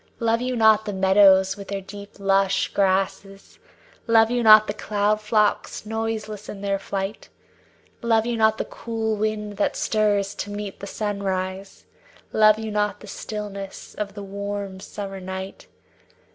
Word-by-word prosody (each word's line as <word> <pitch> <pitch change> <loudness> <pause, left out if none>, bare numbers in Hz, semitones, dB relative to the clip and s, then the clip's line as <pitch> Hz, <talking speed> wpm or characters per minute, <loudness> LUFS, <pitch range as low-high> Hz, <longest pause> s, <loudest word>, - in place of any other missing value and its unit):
Love 230 0 +1
you 255 0 -1
not 220 -2 +5
the 205 - -3
meadows 190 0 +5
with 200 -1 -10
the 200 0 -3
deep 200 +1 -11
lush 195 0 +2
grasses; 195 0 -1 0.5
Love 225 0 +5
you 245 0 +1
not 215 -1 +8
the 205 - -3
cloud 210 0 0
flocks 210 0 0
noiseless 220 -1 -4
in 195 - -7
their 200 -1 -1
flight? 195 +2 -5 0.7
Love 225 -1 +2
you 240 0 -1
not 220 -1 +3
the - - -2
cool 225 -1 -3
wind 210 -1 -3
that 205 - 0
stirs 205 -2 +1
to 205 - -5
meet 205 -1 -6
the 200 - -7
sunrise; 195 -2 -4 0.5
Love 215 0 +6
you 220 -1 -5
not 210 0 -1
the - - -12
stillness 200 -1 -7
of 205 -1 -5
the 205 - -7
warm 200 -1 -5
summer 195 0 -7
night? 190 +1 -7
205 Hz, 155 wpm, -23 LUFS, 195-215 Hz, 0.7 s, not